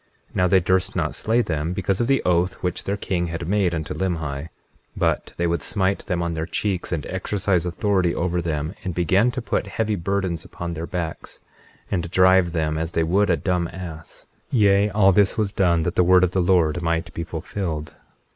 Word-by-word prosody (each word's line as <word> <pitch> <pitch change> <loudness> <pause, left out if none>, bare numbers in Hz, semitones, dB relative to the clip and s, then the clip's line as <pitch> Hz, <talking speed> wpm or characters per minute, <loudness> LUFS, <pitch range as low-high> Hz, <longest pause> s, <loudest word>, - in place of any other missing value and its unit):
21:3 - - -24
Now 90 - +3
they 95 +1 +5
durst 95 +1 +1
not 80 -4 -1
slay 115 +9 +1
them, 80 -1 -2
because 95 +2 -1
of 120 - +1
the 135 0 +2
oath 90 +1 +1
which 90 -1 -2
their 100 +1 -1
king 90 -3 -1
had 85 0 -5
made 95 -3 +1
unto 80 +3 -4
Limhi; 80 -5 -3 0.5
but - - 0
they 85 - 0
would 85 0 0
smite 95 -1 -1
them 90 -3 -1
on 85 0 -2
their 80 0 -3
cheeks, 95 +1 -2
and 80 -4 -2
exercise 95 -1 -1
authority 90 -1 +1
over 90 0 0
them; 80 0 -2
and 90 -3 -4
began 95 +7 +3
to 125 0 -4
put - - -1
heavy 110 -1 -1
burdens 95 -2 -2
upon 85 0 -6
their 85 +1 -5
backs, 85 -4 -5 0.5
and 85 -3 -1
drive 95 -1 +4
them 80 -2 -1
as 80 +1 -3
they 80 - +2
would 95 +5 +2
a 85 - +3
dumb 90 -2 0
ass— 85 -2 -9 0.3
21:4 125 - +2
Yea, 100 0 +4
all 100 -1 +4
this 100 +3 +3
was 105 -2 0
done 85 -5 +2
that 85 - -1
the 90 - +3
word 90 +1 +5
of 90 - +2
the 95 - +1
Lord 85 -2 +2
might 85 0 -1
be 85 - -3
fulfilled. 80 -2 -5
90 Hz, 210 wpm, -23 LUFS, 85-95 Hz, 0.5 s, they